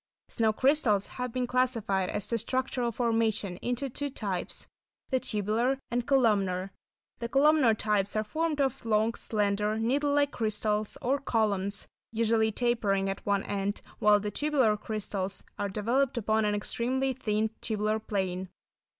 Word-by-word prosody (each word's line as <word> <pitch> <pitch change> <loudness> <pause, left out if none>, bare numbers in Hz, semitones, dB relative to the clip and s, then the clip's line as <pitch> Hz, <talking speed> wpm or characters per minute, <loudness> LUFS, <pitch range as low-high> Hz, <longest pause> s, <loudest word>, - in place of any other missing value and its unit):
Snow 225 -1 +2
crystals 235 -5 +2
have 250 -1 -5
been 250 +1 -1
classified, 230 -7 0
as 205 - -2
to 230 - 0
structural 250 +1 -1
formation, 225 -5 0
into 245 +6 -2
two 285 +3 -3
types; 200 -8 -4 0.5
the 260 - +3
tubular 220 +5 0
and 240 0 -1
columnar. 200 -8 +2 0.5
The 235 -1 -3
columnar 275 -3 +4
types 205 -1 +1
are 215 - +1
formed 310 +7 -1
of 270 -3 0
long, 220 0 +2
slender, 210 0 0
needle 275 +6 +1
like 285 0 +2
crystals 215 -1 -1
or 270 +3 +1
columns, 205 -5 0 0.2
usually 225 -1 +2
tapering 205 -5 +1
at 195 - -7
one 200 -1 +2
end, 200 0 -2 0.2
while 210 0 +5
the 210 0 -3
tubular 265 -4 +2
crystals 200 -2 -4 0.2
are 200 - -1
developed 235 +7 0
upon 220 -1 +1
an 210 0 +1
extremely 260 +5 0
thin 220 -3 -1
tubular 215 0 0
plane. 190 -3 -2
220 Hz, 145 wpm, -29 LUFS, 205-250 Hz, 0.5 s, while